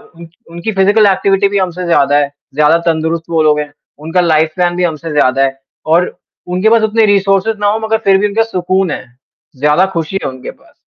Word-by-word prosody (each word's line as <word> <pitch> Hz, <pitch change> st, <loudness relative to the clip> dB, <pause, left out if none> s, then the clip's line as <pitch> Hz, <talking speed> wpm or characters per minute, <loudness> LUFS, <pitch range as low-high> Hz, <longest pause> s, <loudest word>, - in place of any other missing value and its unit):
उन 170 Hz, 0 st, -12 dB, 0.2 s
उनकी 170 Hz, +6 st, -4 dB
physical 205 Hz, +2 st, +3 dB
activity 195 Hz, +1 st, +1 dB
भी 200 Hz, -, -1 dB
हमसे 180 Hz, -1 st, -2 dB
ज़्यादा 145 Hz, -4 st, +2 dB
है, 145 Hz, -1 st, 0 dB, 0.2 s
ज़्यादा 150 Hz, +2 st, +4 dB
तंदुरुस्त 160 Hz, 0 st, -1 dB
वो 165 Hz, -1 st, +1 dB
लोग 150 Hz, -1 st, +2 dB
हैं 145 Hz, 0 st, -5 dB, 0.3 s
उनका 165 Hz, +4 st, -1 dB
लाइफ़ 160 Hz, -2 st, +2 dB
प्लान 175 Hz, -1 st, 0 dB
भी 180 Hz, -, -1 dB
हमसे 165 Hz, -1 st, -3 dB
ज़्यादा 135 Hz, -2 st, +2 dB
है, 135 Hz, 0 st, -2 dB, 0.3 s
और 170 Hz, +3 st, +1 dB, 0.3 s
उनके 185 Hz, +4 st, +1 dB
पास 230 Hz, 0 st, +4 dB
उतने 220 Hz, 0 st, +2 dB
रिसोर्सेस 195 Hz, +1 st, +1 dB
ना 205 Hz, -, 0 dB
हों, 215 Hz, +2 st, +1 dB
मगर 220 Hz, 0 st, 0 dB
फिर 195 Hz, -1 st, +4 dB
भी 210 Hz, +2 st, +1 dB
उनका 225 Hz, +2 st, 0 dB
सुकून 185 Hz, -4 st, -1 dB
है, 130 Hz, -, -5 dB, 0.5 s
ज़्यादा 150 Hz, +7 st, +2 dB
खुशी 165 Hz, +3 st, -3 dB
है -, -, -2 dB
उनके 130 Hz, -1 st, -9 dB
पास। -, -, -25 dB
175 Hz, 210 wpm, -13 LUFS, 155-195 Hz, 0.5 s, ज़्यादा